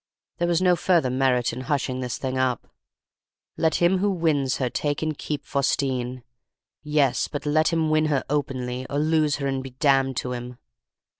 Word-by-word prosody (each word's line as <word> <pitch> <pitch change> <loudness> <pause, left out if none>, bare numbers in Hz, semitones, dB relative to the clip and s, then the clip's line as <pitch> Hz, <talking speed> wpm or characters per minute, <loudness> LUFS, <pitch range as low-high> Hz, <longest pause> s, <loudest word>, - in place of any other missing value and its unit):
There 175 - +1
was 175 +1 +1
no 180 -1 +5
further 170 -7 +2
merit 125 -2 +1
in 125 - -5
hushing 130 -1 -1
this 125 -3 -3
thing 130 -1 -3
up. 130 -2 0 0.9
'Let 160 -2 +1
him 175 +2 +3
who 205 +2 +2
wins 155 -8 +1
her 130 - 0
take 145 +4 -2
and 155 -1 -1
keep 150 0 -5
Faustine.' 130 -3 -1 0.6
Yes, 150 -3 +1
but 145 0 -6
let 155 +2 +3
him 160 -2 +1
win 155 0 +3
her 145 -4 +1
openly, 130 -3 -2
or 140 - -2
lose 155 -1 +2
her 140 - -4
and 135 -1 -1
be 135 - -7
damned 135 0 +2
to 125 - -2
him! 125 0 -7
140 Hz, 180 wpm, -24 LUFS, 130-155 Hz, 0.9 s, no